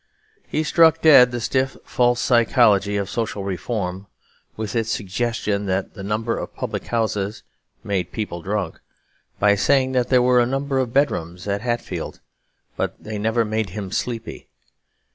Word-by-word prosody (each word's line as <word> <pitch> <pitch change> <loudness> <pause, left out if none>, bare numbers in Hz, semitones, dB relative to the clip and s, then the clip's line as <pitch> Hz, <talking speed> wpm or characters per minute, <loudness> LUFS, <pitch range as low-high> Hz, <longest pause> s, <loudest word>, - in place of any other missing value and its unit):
He 155 - -1
struck 165 0 +4
dead 135 -6 +8
the 120 0 -4
stiff 130 +3 0
and - - -20
false 120 -1 +2
psychology 110 -5 +3
of 100 -1 -2
"social 110 -3 -3
reform," 95 0 -3 0.5
with 110 +1 -4
its 115 -1 0
suggestion 105 -1 -2
that 95 0 -1
the 100 - -9
number 110 +4 -1
of - - -7
public - - -4
houses 110 -3 -1 0.4
made 90 -3 -2
people 95 -6 -4
drunk, 100 -2 -3 0.6
by 100 0 +4
saying 130 +5 +2
that 125 -2 0
there 125 -2 +4
were 125 0 +4
a 120 - +3
number 135 +1 -1
of 125 -3 -1
bedrooms 90 - -1
at 100 0 -1
Hatfield, 120 0 -3 0.6
but - - -2
they 105 -1 -5
never 110 +2 +1
made 110 -1 -1
him 100 -3 -5
sleepy. 115 0 -4
110 Hz, 160 wpm, -22 LUFS, 100-125 Hz, 0.6 s, dead